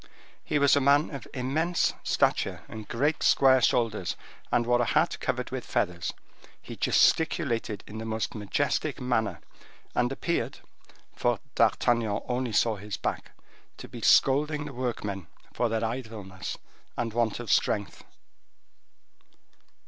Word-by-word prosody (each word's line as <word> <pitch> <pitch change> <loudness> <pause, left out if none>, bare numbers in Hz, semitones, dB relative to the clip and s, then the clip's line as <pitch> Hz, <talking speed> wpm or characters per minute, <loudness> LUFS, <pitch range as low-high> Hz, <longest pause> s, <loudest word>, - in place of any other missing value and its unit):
He - - 0
was 140 -1 +5
a 145 - +3
man 145 +4 +4
of 140 - -7
immense 155 +7 0
stature - - +1
and 110 -1 -9
great 145 +6 0
square 130 -1 +5
shoulders, 110 -7 +1 0.4
and 120 -1 +2
wore 120 0 +3
a - - +2
hat - - +1
covered - - -2
with - - -4
feathers. 85 -1 -1 0.5
He - - -9
gesticulated 120 - +2
in 110 +1 -8
the 110 - -5
most 110 0 -2
majestic 105 -3 -1
manner, 110 -8 -1 0.5
and 120 +1 +1
appeared, 170 +5 -2 0.6
for 120 -2 +1
D'Artagnan 115 -4 +2
only 125 -1 -1
saw 110 0 +2
his 105 +1 -6
back, - - -4 0.4
to - - -9
be - - -9
scolding 145 +2 +4
the 145 - -7
workmen 105 -7 -3 0.3
for 120 - 0
their 115 0 0
idleness 110 -6 -5 0.4
and 115 -2 -2
want 115 -2 0
of 120 -4 -3
strength. 100 -1 0
120 Hz, 135 wpm, -28 LUFS, 110-135 Hz, 0.6 s, was